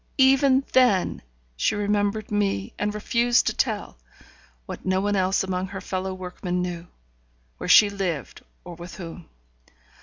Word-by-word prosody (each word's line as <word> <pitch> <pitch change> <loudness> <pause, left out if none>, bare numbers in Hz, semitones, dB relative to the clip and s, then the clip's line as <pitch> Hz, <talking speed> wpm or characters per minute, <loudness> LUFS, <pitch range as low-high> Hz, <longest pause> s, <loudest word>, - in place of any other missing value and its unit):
even 270 0 +4
then 245 -8 +3 0.3
she - - 0
remembered 205 +1 -1
me, 195 - -1
and 210 0 -1
refused 235 +3 +2
to - - +1
tell - - -2 0.7
(what - - -8
no 185 0 +1
one 205 +1 0
else 190 0 +1
among 185 0 -2
her 190 0 -7
fellow 185 0 -3
workmen 180 -1 -4
knew), 175 -1 -4 0.7
where - - -5
she 210 - +8
lived 185 - -4 0.2
or 175 - -9
with 175 +1 -10
whom. 175 -2 -9
190 Hz, 145 wpm, -24 LUFS, 180-210 Hz, 0.7 s, she